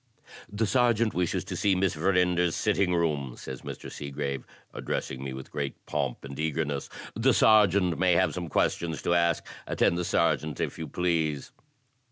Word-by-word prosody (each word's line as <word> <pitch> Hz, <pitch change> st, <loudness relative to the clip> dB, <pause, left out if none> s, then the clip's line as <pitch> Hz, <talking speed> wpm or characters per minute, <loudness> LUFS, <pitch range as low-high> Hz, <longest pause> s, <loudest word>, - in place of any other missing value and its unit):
"The 105 Hz, +2 st, 0 dB
Sergeant 115 Hz, -1 st, +2 dB
wishes 90 Hz, -1 st, 0 dB
to -, -, -6 dB
see 100 Hz, -2 st, +2 dB
Miss 95 Hz, 0 st, +1 dB
Verinder*s 90 Hz, 0 st, +2 dB
sitting 100 Hz, -4 st, +1 dB
room," 75 Hz, -7 st, -1 dB
says 65 Hz, -1 st, -7 dB
Mr. -, -, -8 dB
Seegrave, 70 Hz, -1 st, -4 dB, 0.3 s
addressing 65 Hz, 0 st, -4 dB
me 70 Hz, -, -4 dB
with 65 Hz, 0 st, -8 dB
great 70 Hz, -2 st, -3 dB
pomp 70 Hz, -4 st, -2 dB
and 70 Hz, 0 st, -8 dB
eagerness. 75 Hz, -2 st, -2 dB, 0.3 s
"The 120 Hz, +4 st, +3 dB
Sergeant 100 Hz, -5 st, +4 dB
may 90 Hz, -1 st, +4 dB
have 95 Hz, +2 st, +2 dB
some 90 Hz, -2 st, -4 dB
questions 80 Hz, +1 st, 0 dB
to 85 Hz, -, +2 dB
ask. 85 Hz, 0 st, +2 dB, 0.2 s
Attend 85 Hz, -, +2 dB
the -, -, 0 dB
Sergeant, 80 Hz, -3 st, +1 dB
if -, -, -3 dB
you 80 Hz, -, -4 dB
please!" 80 Hz, -5 st, -1 dB
85 Hz, 165 wpm, -28 LUFS, 75-95 Hz, 0.3 s, Sergeant